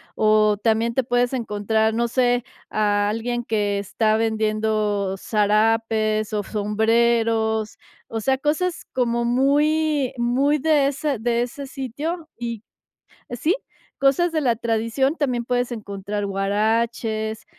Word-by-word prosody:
o, 215 -1 +3
también 225 +1 +1
te 265 - +1
puedes 245 +1 +1
encontrar, 220 -1 0
no 235 +1 +1
sé, 245 0 +1 0.3
a 205 -1 +1
alguien 240 +2 -2
que 205 -3 0
está 215 +2 +1
vendiendo 215 -3 0
sarapes, 215 +1 +1
o, 205 -1 0
sombreros, 220 +1 +1 0.3
o 225 - -4
sea, 265 +3 +1
cosas 315 +5 -1
como 235 -2 0
muy 290 +2 +2
muy 270 +5 +2
de 295 -2 +3
ese 280 0 -1
de 235 +1 0
ese 275 +3 -6
sitio 295 +6 -5
y 235 -2 -5 0.7
sí, 305 - +1 0.4
cosas 280 +6 +2
de 320 - 0
la 245 -6 +2
tradición, 230 +6 0
también 250 -5 0
puedes 245 0 -1
encontrar 205 -1 -4
huaraches, 220 +2 -1
230 Hz, 125 wpm, -22 LUFS, 215-255 Hz, 0.7 s, o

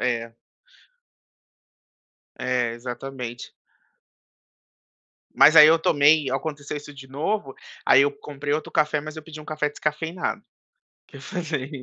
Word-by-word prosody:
É. 115 -2 -2 2.0
É, 125 -2 0
exatamente. 125 0 -7 1.8
Mas 155 +3 +7
aí 150 - +11
eu 165 +1 +5
tomei 145 -2 +3
aconteceu 145 +1 -4
isso 145 0 -9
de 135 -1 -12
novo, 145 +1 -3 0.3
aí 135 - +6
eu 145 - +2
comprei 145 0 -6
outro 155 +1 -3
café, 150 0 +1
mas 155 +1 -9
eu 155 - -7
pedi 155 -1 -11
um - - -12
café 155 -1 -2
descafeinado. 160 +4 -3
O - - -39 0.6
que - - -13
fazer? 155 -6 -4
145 Hz, 125 wpm, -24 LUFS, 130-155 Hz, 2.0 s, aí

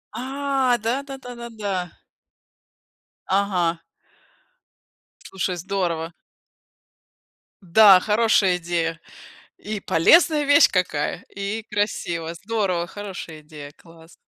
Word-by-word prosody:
А, 265 0 0
да 235 +5 -2
да 270 -1 -8
да 245 -2 -10
да 235 0 -8
да. 195 -6 -4 1.4
Ага. 180 -4 0 1.4
Слушай, 185 -1 -4
здорово. 175 -3 -3 1.5
Да, 190 +1 +7
хорошая 210 -4 +2
идея. 165 -1 -2 0.6
И 210 -1 -5
полезная 300 - +4
вещь 285 0 +6
какая, 170 -6 -1
и 200 +3 -4
красиво. 170 -5 -2
Здорово, 190 -3 -2
хорошая 190 -6 -8
идея, 150 -1 -11
класс. 165 +1 -18
195 Hz, 90 wpm, -22 LUFS, 170-225 Hz, 1.5 s, Да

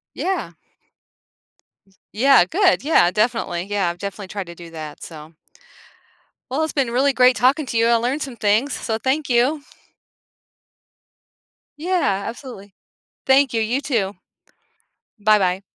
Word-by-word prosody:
Yeah. 380 +1 -3 1.6
Yeah, 250 -4 +5
good, 370 - +2
yeah, 285 - +4
definitely, 210 -4 -1
yeah, 200 -3 -1
I've 175 - -8
definitely 200 0 -7
tried 200 0 -5
to 170 - -10
do 170 -1 -12
that, 155 -2 -9
so 155 0 -11 1.2
Well, 290 +5 0
it's 315 - -4
been 270 -5 0
really 270 +4 +2
great 250 -1 +4
talking 275 +4 +2
to 235 - -4
you, 230 0 +3
I 235 - +4
learned 250 +6 -1
some 260 -4 -6
things, 220 +7 +1
so 220 - -3
thank 270 +6 -1
you. 255 +5 +2 2.2
Yeah, 315 - 0
absolutely. 230 -5 -9 0.5
Thank 270 0 +4
you, 225 - +1
you 240 +5 -1
too. 230 -9 -1 1.1
Bye 210 0 +4
bye. 185 0 0
235 Hz, 135 wpm, -21 LUFS, 195-275 Hz, 2.2 s, Yeah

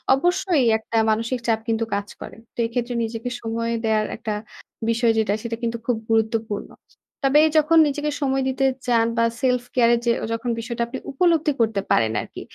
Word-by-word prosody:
অবশ্যই 350 -2 +1
একটা 225 +1 -4
মানসিক 230 +3 0
চাপ 225 -1 +2
কিন্তু 225 0 0
কাজ 200 0 -3
করে। - - -8 0.2
তো - - -33
এক্ষেত্রে 240 +1 -2
নিজেকে 225 +2 -4
সময় 230 +1 -2
দেয়ার 215 -1 +2
একটা 220 -2 -3 0.6
বিষয় 230 0 +3
যেটা, 215 -2 +2
সেটা 230 0 -3
কিন্তু 235 0 -1
খুব 245 -3 +1
গুরুত্বপূর্ণ। 220 -1 0 0.5
তবে 275 +2 +5 0.2
যখন 310 +2 +4
নিজেকে 295 +1 -2
সময় 270 -1 +1
দিতে 270 +1 0 0.2
চান 230 -2 +3
বা 230 - +4 0.2
self 250 -2 +2
care 240 -1 +5
যে, 235 - +4 0.2
যখন 230 +2 -3
বিষয়টা 235 0 -3
আপনি 260 +2 -6
উপলব্ধি 325 0 +2
করতে 220 -3 +1
পারেন 110 -1 +3
আরকি। - - -9
235 Hz, 170 wpm, -23 LUFS, 225-265 Hz, 0.6 s, তবে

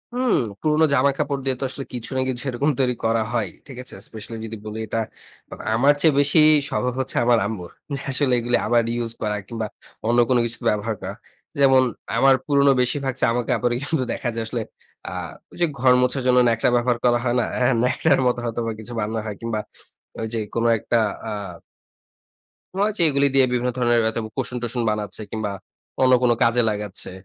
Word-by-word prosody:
হুম, 250 -2 +1 0.3
পুরনো 155 +1 +3
জামা 140 +1 +4
কাপড় 140 -2 -1
দিয়ে 130 -1 +1
তো - - -4
আসলে 135 0 -6
কিছু 120 -2 -5
না - - +2
কিছু 125 0 -3
এরকম 140 +5 +1
তৈরি 125 -1 +2
করা 115 0 +2
হয়ই 105 -7 -1 0.2
ঠিক 130 -3 -10
আছে? - - -12
স্পেশালি 110 +1 -8
যদি 110 0 -6
বলি 110 +1 -5
এটা 115 - -2 0.5
আম - - -9 0.2
আমার 140 +5 +5
চেয়ে 155 -3 +5
বেশি 145 +3 +4 0.3
স্বভাব 125 -1 -1
হচ্ছে 130 - -3
আমার 120 -1 +5
আম্মুর। 95 -5 -5 0.2
যে 140 - -5
আসলে 130 -1 +1
এগুলি 120 +1 +1
আবার 120 0 +3
ইউস 115 -1 -2
করা 105 -1 -1
কিংবা 115 -2 -4 0.4
অন্য 120 +1 +3
কোন 125 - +4
কিছু 115 -1 -3
ব্যবহার 105 +1 -1
করা। 95 +1 -5 0.5
যেমন 135 -1 +6 0.3
আমার 135 +3 +5
পুরনো 140 -1 +4
বেশিরভাগ 135 +1 0
জমা 120 0 +2
কাপড়ই 120 -1 +1
কিন্তু 145 -3 0
দেখা 120 - -3
যায় 115 - -2
আসলে 115 0 -3 0.5
আ - - -5 0.4
ওই - - -14
যে, 175 - +6
ঘর 125 0 +5
মোছার 125 +2 +1
জন্য 125 0 +4
ন্যাকড়া 115 +1 +2
ব্যবহার 120 0 +2
করা 120 0 +4
হয় 120 -1 +1
না, 120 - +2 0.2
হ্যাঁ, 125 +1 +3
ন্যাকড়ার 125 - +2
মতো 125 - +1
হয়তো 115 0 -3
বা 115 - -1
কিছু 120 +2 -7
বানানো 110 +1 -2
হয় 105 -2 -4
কিংবা 115 -2 -2 0.6
ওই 110 - -2
যে - - -1 0.2
কোন 115 0 0
একটা 120 - 0 0.3
আ - - -4 1.4
মনে 200 +2 +2
হচ্ছে 210 -5 0
এগুলি 140 0 +3
দিয়ে 135 -1 +6
বিভিন্ন 125 0 0
ধরনের 120 -1 +3
হয়তোবা 110 0 -2
কুশন-টুসন 125 -2 -2
বানাচ্ছে 105 -1 -3
কিংবা 110 -2 -3 0.5
অন্য 130 0 +5
কোন 120 - +4
কাজে 115 +1 +3
লাগাচ্ছে। 105 -3 -4
120 Hz, 195 wpm, -22 LUFS, 115-130 Hz, 1.4 s, যেমন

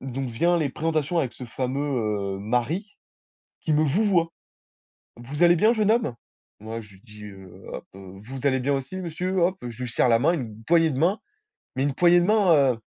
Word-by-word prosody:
donc 130 0 -4
vient 170 +10 +1
les 155 -3 0
présentations 155 +3 -1
avec 130 -7 -1
ce 125 - -9
fameux, 120 -6 -2
heu, - - -8
mari 125 - -2 0.6
qui 160 - -1
me 150 +1 +3
vouvoie: 170 +1 +2 0.9
«Vous 135 +7 -3
allez 175 0 +6
bien 215 +7 +4
jeune 215 -2 +2
homme?», 225 - 0 0.4
moi 110 +2 -6
je 105 -2 -16
lui 95 - -19
dis, 105 -2 -13
heu, 95 -2 -11 0.2
hop, - - -7
heu: 95 -1 -11
«Vous 130 +5 -4
allez 130 -1 +2
bien 140 +3 0
aussi, 135 +7 -4
monsieur?», 185 +1 -2
hop, 180 +2 +2
je 120 +2 -7
lui 125 - -4
serre - - +2
la 115 - +4
main 145 +7 +3
une 110 -8 -6
poignée 165 0 +3
de 130 - -4
main, 185 +7 +2 0.6
mais 130 - 0
une 145 - -1
poignée 175 +3 +5
de 175 - +1
main, 205 -4 +4 0.2
heu, - - -12
140 Hz, 210 wpm, -24 LUFS, 120-175 Hz, 0.9 s, allez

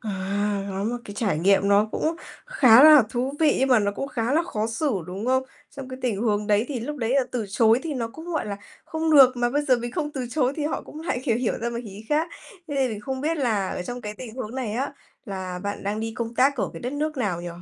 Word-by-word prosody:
À, 200 -1 -2
có 195 +1 -3
một 235 +3 -1
cái 205 -4 -9
trải 205 -8 0
nghiệm 195 +3 +3
nó 200 +1 +5
cũng 320 +2 0 0.3
khá 260 - +6
là 305 -2 +9
thú 255 +3 -1
vị, 305 -3 +4
nhưng 270 - +2
mà 250 -3 +6
nó 200 -1 +1
cũng 275 +7 -4
khá 245 -2 -1
là 320 +3 +3
khó 220 -11 -2
xử, 230 +7 -1 0.2
đúng 195 +5 -5
không? 260 +1 +3 0.3
Trong 275 -3 -9
cái 255 0 -7
tình 225 -6 -1
huống 210 -2 0
đấy 210 +1 +3
thì 265 -5 -3
lúc 295 +6 -5
đấy 230 -4 -2
là 275 - +5
từ 235 -4 -2
chối 225 +3 +4
thì 315 -3 -3
nó 235 -3 -2
cũng, 320 +8 -11
gọi 330 -8 -2
là, 200 -1 -4 0.3
không 320 0 -2
được, 260 -3 +7
mà 240 0 +1
bây 290 +3 +1
giờ 260 -3 +4
mình 240 0 -5
không 295 -1 -2
từ 260 -4 -4
chối 265 -2 +1
thì 305 - -2
họ 300 - -2
cũng 305 - -10
lại 315 -6 -2
hiểu 230 -5 +2
hiểu 240 -1 0
ra 235 +1 -2
một 235 - -4
ý 205 0 -10
khác. 310 +3 +1 0.4
Thế 290 - -4
nên 265 -2 +1
mình 210 -2 -5
không 260 +5 -4
biết 320 +4 0
là 220 -9 0
ở - - -4
trong 245 +6 -6
cái 210 -2 -6
tình 225 0 -9
huống 245 -2 -6
này 250 -5 -3
á, 265 +6 -2 0.3
là 190 -4 -5
bạn 200 0 -4
đang 205 +2 -2
đi 225 0 -3
công 235 0 -4
tác 275 +4 +3
ở 235 - -1
cái - - -9
đất 250 +2 -4
nước 305 +1 -2
nào 200 -9 -1
nhỉ? 175 - -5
240 Hz, 280 wpm, -24 LUFS, 210-275 Hz, 0.4 s, là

